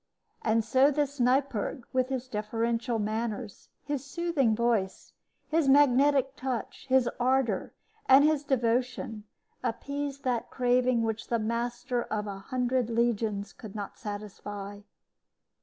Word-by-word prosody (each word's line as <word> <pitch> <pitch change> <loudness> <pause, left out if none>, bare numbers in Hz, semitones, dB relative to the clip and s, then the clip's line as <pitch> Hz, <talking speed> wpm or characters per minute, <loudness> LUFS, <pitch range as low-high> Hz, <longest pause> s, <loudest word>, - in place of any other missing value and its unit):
And 225 0 +2
so 260 +5 +5
this 285 -1 -1
Neipperg, 250 -2 +1
with 255 0 +1
his 260 -1 -3
deferential 230 +2 -1
manners, 215 0 -3
his 285 -2 -3
soothing 285 -6 +1
voice, 225 -5 -1 0.3
his 310 -3 +2
magnetic 275 0 +4
touch, 260 -1 -4
his 260 -2 +4
ardor, 250 -5 +1 0.4
and 265 +2 +8
his 305 -1 +3
devotion, 245 -4 -1 0.4
appeased 280 +3 -3
that 245 -3 -1
craving 250 -1 +2
which 225 -1 -2
the 235 - +1
master 240 +2 -2
of 210 -1 -2
a 200 -1 -6
hundred 250 +2 -1
legions 225 -3 0
could 215 -3 -11
not 205 -2 -6
satisfy. 205 -1 -6
240 Hz, 125 wpm, -29 LUFS, 220-265 Hz, 0.4 s, and